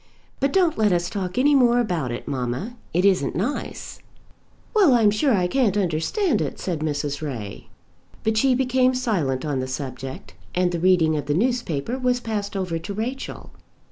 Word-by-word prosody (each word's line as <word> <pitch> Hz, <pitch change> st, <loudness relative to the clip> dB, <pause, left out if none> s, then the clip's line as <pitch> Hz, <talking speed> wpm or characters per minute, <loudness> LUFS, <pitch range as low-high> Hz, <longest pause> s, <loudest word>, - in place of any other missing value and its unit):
But 275 Hz, +1 st, +1 dB
don't 350 Hz, -8 st, +2 dB
let 210 Hz, -2 st, +4 dB
us 175 Hz, 0 st, 0 dB
talk 190 Hz, +1 st, -4 dB
any 285 Hz, +3 st, +4 dB
more 245 Hz, -3 st, +5 dB
about 175 Hz, -, -1 dB
it, 120 Hz, -, -6 dB
mamma. 130 Hz, -, -3 dB, 0.2 s
It 180 Hz, +3 st, +1 dB
isn't 180 Hz, -10 st, +2 dB
nice." 220 Hz, -, -4 dB, 0.7 s
"Well, 380 Hz, -, +5 dB
I'm 220 Hz, -3 st, +5 dB
sure 265 Hz, +7 st, +2 dB
I 190 Hz, -6 st, +2 dB
can't 210 Hz, +1 st, +1 dB
understand 190 Hz, -, 0 dB
it," 145 Hz, -, -3 dB
said 175 Hz, -4 st, -2 dB
Mrs. 145 Hz, -1 st, -2 dB
Ray. 115 Hz, -10 st, -6 dB, 0.6 s
But 220 Hz, 0 st, +1 dB
she 255 Hz, +3 st, +3 dB
became 255 Hz, 0 st, +2 dB
silent 170 Hz, -, -1 dB
on 145 Hz, -3 st, -1 dB
the 130 Hz, -, -2 dB
subject, 130 Hz, -6 st, -6 dB, 0.2 s
and 180 Hz, 0 st, +2 dB
the 170 Hz, -, -2 dB
reading 170 Hz, -3 st, +3 dB
of 145 Hz, -1 st, -4 dB
the 145 Hz, -, +1 dB
newspaper 235 Hz, -, -1 dB
was 250 Hz, -1 st, +1 dB
passed 205 Hz, -4 st, -3 dB
over 180 Hz, -4 st, -2 dB
to 185 Hz, +5 st, -6 dB
Rachel. 250 Hz, +5 st, -5 dB
190 Hz, 175 wpm, -23 LUFS, 150-245 Hz, 0.7 s, more